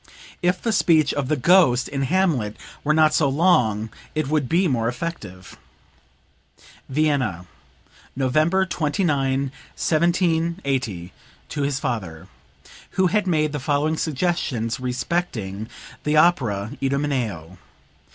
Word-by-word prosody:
If 180 0 +1
the 230 - -1
speech 160 -8 +3
of 145 -2 -2
the 155 - +1
'Ghost' 140 -4 +4
in 135 -1 -3
'Hamlet' 140 - 0 0.3
were 150 - +1
not 155 -1 +4
so 145 -3 +3
long 125 - +2 0.2
it 155 -3 0
would 150 -4 0
be 180 +3 +3
more 120 -6 0
effective." 115 - -6 1.3
(Vienna, 135 - 0 0.7
November 155 +8 +2
29, 145 -6 0 0.2
1780, 160 - 0 0.4
to 145 - -3
his 140 -1 0
father, 95 -12 -4 0.7
who 190 - +4
had 210 -2 +1
made 155 -3 +1
the 150 - -3
following 145 +3 0
suggestions 145 -8 -1
respecting 125 - -3 0.3
the 150 +1 +1
opera 115 - +2
"Idomeneo." 125 - -2
145 Hz, 110 wpm, -22 LUFS, 120-165 Hz, 1.3 s, Ghost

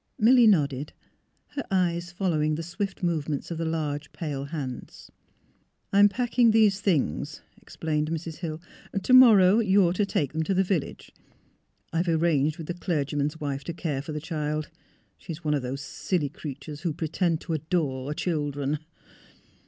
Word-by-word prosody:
Milly 240 +1 +6
nodded, 145 -7 +2 0.6
her 285 - -4
eyes 175 -2 0
following 160 -4 0
the 165 - -4
swift 195 +3 -4
movements 155 -3 -1
of 165 - -4
the 165 - -1
large, 150 -2 -3
pale 145 -4 -4
hands. 140 -5 -7 0.4
" - - -41
I 200 - +5
am 205 0 +8
packing 240 +1 +2
these 215 -3 +4
things," 160 - 0 0.2
explained 155 -1 -2
Mrs. 165 0 -4
Hill; 160 -3 -5 0.2
" 195 - -5
to 255 - +2
morrow 220 -6 +8
you 200 -4 +4
are 170 - +1
to 205 - +1
take 145 -7 -1
them 160 - -1
to 190 +4 0
the 190 - +4
village. 180 -6 -3 0.8
I - - 0
have 175 +2 +1
arranged 160 -2 +2
with 165 - -7
the 175 - -3
clerg^Tnan's 150 -3 -2
wife 140 -2 -3
to 170 - -4
care 150 -5 -3
for 150 - -7
the 150 - -3
child. 155 -1 -3 0.5
She 165 - -7
is 165 +2 -11
one 150 -1 +1
of 145 - +1
those 130 +2 -4
silly 150 +1 -2
creatures 145 +1 -8
who 170 -2 -1
pretend 165 +1 0
to 165 - -4
adore 150 -4 -1
children." 145 -4 -1
160 Hz, 175 wpm, -26 LUFS, 150-185 Hz, 0.8 s, am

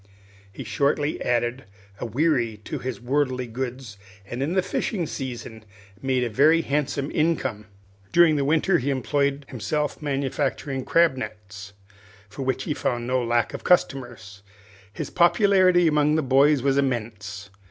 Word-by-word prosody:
He - - -8
shortly 145 +1 0
added 120 +1 -1 0.3
a 120 - -3
wherry 120 -3 +1
to - - -5
his 130 -1 -5
worldly 130 0 0
goods, 125 -2 -6 0.3
and 120 +5 -6
in 150 +5 -1
the 190 - +2
fishing 185 0 -2
season 120 -6 -6 0.4
made 130 -2 0
a - - 0
very 155 +8 +4
handsome 145 -1 -2
income. 150 - -1 0.4
During 170 -3 +5
the 140 - +1
winter 165 +5 +2
he 135 +2 -2
employed 140 +1 0
himself 145 +7 -2
manufacturing 135 -1 -2
crab 165 -5 +3
nets, 100 -3 -8 0.6
for 110 - -8
which 130 -1 -1
he 150 - -2
found 120 -4 -2
no 125 0 0
lack 120 0 0
of - - -7
customers. 120 - 0 0.5
His - - -6
popularity 185 -1 +4
among 150 -1 +3
the 160 - +1
boys 135 +1 +4
was 140 0 +2
immense. 105 -6 -3
135 Hz, 145 wpm, -24 LUFS, 120-150 Hz, 0.6 s, During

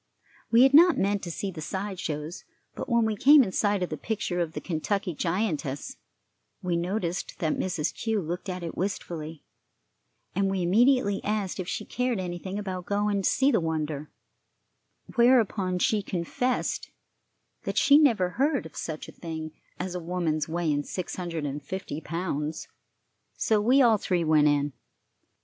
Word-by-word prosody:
We 235 +2 +6
had 270 +1 +5
not 340 +4 +7
meant 200 +1 +1
to 175 - -5
see 195 +4 -3
the 165 -3 -8
side 190 +4 -4
shows; 155 +2 -4 0.3
but - - -6
when 235 -2 +3
we 220 -1 0
came 280 +6 +7
in 195 - -3
sight 205 -1 +1
of 180 - -4
the - - -3
picture 200 -5 -2
of 165 -2 -1
the - - -4
Kentucky 185 +2 -2
giantess, 165 -5 -2 0.6
we 180 -1 -1
noticed 175 +1 -2
that 160 -5 0
Mrs. 175 -5 -1
Kew 220 -2 -1
looked 175 +2 -4
at 180 -1 -4
it 165 - -5
wistfully, 165 -5 -4 0.9
and 195 +1 +1
we 190 -2 -1
immediately 210 +2 +3
asked 205 -3 -2
if 180 - -3
she 215 +2 -3
cared 250 -4 -1
anything 185 +2 -4
about 185 -3 -5
going 205 0 +1
to - - +2
see 270 +1 +3
the 225 - +3
wonder, 155 -3 -3 1.1
whereupon 225 -7 +3
she 210 +4 +2
confessed 195 +8 -2 0.8
that - - -3
she 285 +1 +7
never 225 -12 +3
heard 275 - +1
of 160 - -11
such 155 -2 -5
a - - -9
thing 160 -2 -6 0.3
as 180 0 -3
a 180 - -3
woman's 165 -3 -1
weighing 160 -3 0
six 180 +5 -5
hundred 170 -4 -4
and 145 +1 -4
fifty 160 0 -5
pounds; 160 -3 -3 0.7
so 215 -2 +2
we 260 +5 +5
all 230 -3 +5
three 180 -3 0
went 155 -2 +4
in. 145 -1 +1
185 Hz, 170 wpm, -27 LUFS, 165-210 Hz, 1.1 s, not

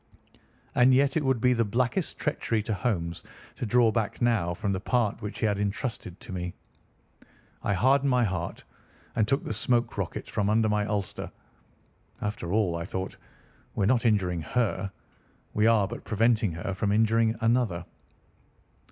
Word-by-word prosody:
And 130 +1 +5
yet 140 +1 +3
it 160 - +1
would 130 -3 +2
be 125 +2 +4
the 115 -1 +2
blackest 125 - -1
treachery 110 -2 -1
to 110 0 -2
Holmes 90 -7 -2 0.3
to 120 - -4
draw 120 +1 +4
back 110 -2 -2
now 115 -8 +2
from 100 +3 -2
the 95 - -1
part 115 +1 0
which 105 +1 -5
he - - 0
had 105 -2 +1
intrusted 100 -2 -3
to - - -10
me. 90 -1 -4 1.1
I 100 - 0
hardened 135 +8 +3
my 125 -1 +3
heart, 95 -5 -3 0.5
and 105 - +2
took 135 +3 +1
the - - -3
smoke 120 +3 +1
rocket - - -4
from 100 0 0
under 110 +1 +3
my 105 -1 +1
ulster. 105 -2 -3 0.9
After 105 -4 -3
all, 100 -5 +2
I 85 - -3
thought, 95 +2 -4 0.6
we - - 0
are - - +3
not 120 - 0
injuring 90 -6 +1
her. 100 +1 -1 0.6
We 105 +1 +3
are 110 -4 +4
but - - -7
preventing 110 -2 +2
her 85 +4 -4
from 100 +2 -1
injuring 110 +1 +3
another. 115 -7 +1
105 Hz, 170 wpm, -27 LUFS, 95-120 Hz, 1.1 s, And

